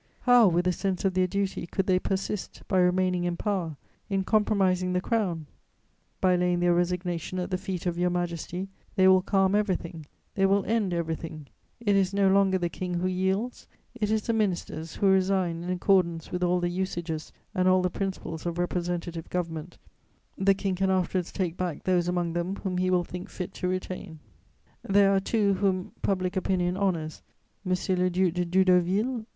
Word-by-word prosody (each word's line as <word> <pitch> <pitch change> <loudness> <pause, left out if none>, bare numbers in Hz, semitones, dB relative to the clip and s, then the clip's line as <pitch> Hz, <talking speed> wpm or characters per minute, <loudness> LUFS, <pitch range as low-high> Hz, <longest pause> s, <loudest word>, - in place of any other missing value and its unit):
How, 245 -3 +6
with 175 0 +2
a 180 - +3
sense 190 +1 -2
of 190 - +2
their 185 0 +2
duty, 195 -2 -2
could 190 +2 -1
they 185 -1 +3
persist, 195 +1 -3
by 190 - +2
remaining 180 0 +2
in 175 -1 -1
power, 180 -8 -2 0.3
in 195 -1 0
compromising 190 -3 +2
the 180 - +2
Crown? 185 -7 -1 0.7
By 185 -1 +3
laying 180 0 +1
their 175 0 +3
resignation 175 0 -1
at 180 +1 -3
the 185 - +1
feet 190 -2 -4
of 175 -1 -1
your 180 0 +2
Majesty 175 +1 -3 0.3
they 190 0 +5
will 185 0 +6
calm 195 0 +2
everything, 180 -6 -1 0.3
they 195 -1 +3
will 195 0 +2
end 215 -3 +1
everything; 165 -2 -4 0.3
it 205 -4 +2
is 195 0 +2
no 200 -1 +4
longer 195 -1 +4
the 175 -1 -1
King 180 +1 -4
who 175 +1 -1
yields, 190 +6 -1 0.3
it 215 -4 -2
is 215 -1 +1
the 230 - 0
ministers 175 -6 -2
who - - -1
resign 190 -3 +2
in 175 - -5
accordance 180 -2 +1
with 180 - -3
all 180 0 +2
the 175 0 0
usages 175 -3 -3 0.2
and 185 0 +1
all 185 0 +4
the 180 - 0
principles 185 -4 -4
of 170 0 -3
representative 175 -1 -3
government 165 -1 -4 0.6
The 195 0 +3
King 195 -1 -1
can 190 +1 0
afterwards 185 -1 0
take 180 -4 -2
back 180 -4 -3
those 180 -2 +2
among 175 -2 -1
them 175 +3 -2
whom 185 -3 -3
he 185 0 +1
will 180 -1 +3
think 180 +1 -8
fit 180 - -6
to 180 - -3
retain: 185 -2 -4 0.6
there 200 0 +4
are - - +4
two 200 0 +1
whom 190 -1 0
public 185 -1 0
opinion 180 -1 0
honours, 170 -6 -1 0.4
M. 185 - -3
le 180 0 +1
Duc 180 -1 +1
de 180 0 -1
Doudeauville 180 +1 +3
and 250 +2 -1
M. 220 - -11
185 Hz, 190 wpm, -27 LUFS, 175-195 Hz, 0.7 s, How